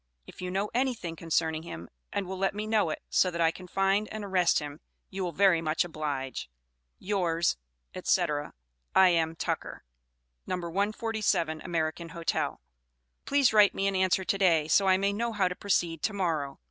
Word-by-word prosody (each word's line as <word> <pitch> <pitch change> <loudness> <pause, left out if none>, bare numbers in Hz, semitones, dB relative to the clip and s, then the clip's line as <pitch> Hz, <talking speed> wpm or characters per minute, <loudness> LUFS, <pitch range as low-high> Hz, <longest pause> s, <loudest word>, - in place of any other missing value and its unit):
If - - -12
you 180 - -3
know 195 +3 -2
anything 240 -9 -1
concerning 160 -1 0
him 85 - -8 0.2
and 200 - -2
will 190 +1 -6
let 195 +1 0
me 210 +1 -3
know 215 -5 +2
it, 155 - -5
so 185 - +4
that 170 -1 -5
I 165 -1 +4
can 180 +2 -11
find 195 +3 +1
and 215 -1 -5
arrest 185 -3 +3
him, 145 0 -5 0.3
you 190 0 -3
will 175 - -2
very 180 -1 +4
much 160 +1 0
oblige 145 - -4 0.5
Yours, 175 -4 0 0.5
&c., 185 - +3 0.7
I.M. 165 -3 +4
TUCKER. - - -4 0.6
No. - - -1
147 195 -2 -1
American 165 -1 -2
Hotel. 170 -1 -2 0.7
Please 280 -4 +3
write 210 -2 +6
me 195 - -1
an 195 0 +1
answer 185 0 +2
to 195 - 0
day, 165 -6 +3
so 195 +5 +4
I 185 0 +5
may 200 +1 +1
know 230 +2 -2
how 195 -3 +2
to 180 - -4
proceed 175 -5 0
to 215 - -1
morrow. 160 -8 -1
180 Hz, 175 wpm, -29 LUFS, 165-200 Hz, 0.7 s, write